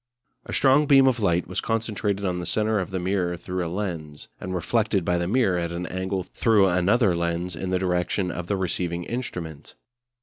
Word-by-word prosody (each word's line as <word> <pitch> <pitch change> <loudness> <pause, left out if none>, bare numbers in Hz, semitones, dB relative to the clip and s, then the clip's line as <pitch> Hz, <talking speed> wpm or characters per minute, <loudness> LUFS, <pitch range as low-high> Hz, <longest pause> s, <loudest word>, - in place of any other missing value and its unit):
A - - -6
strong 140 +2 +4
beam 135 -1 +7
of 130 -3 +2
light 90 -4 +1
was 90 - -3
concentrated 105 -3 -1
on 90 -1 -1
the 90 - -4
centre 110 +2 +1
of 90 - -3
the 95 - -3
mirror 90 -1 -1
through 90 +1 -4
a 85 - -3
lens, 85 -6 -5
and 95 0 -4
reflected 100 0 0
by 90 0 +1
the 85 - -1
mirror 100 -5 +2
at 85 -1 -3
an 85 +1 -4
angle 95 +1 -3
through 105 +1 +3
another 95 +4 +3
lens 85 +1 -2
in 95 - -4
the 95 - +1
direction 90 0 0
of 85 0 -5
the 100 - 0
receiving 90 -1 -2
instrument. 85 - -6
95 Hz, 200 wpm, -25 LUFS, 85-105 Hz, -, beam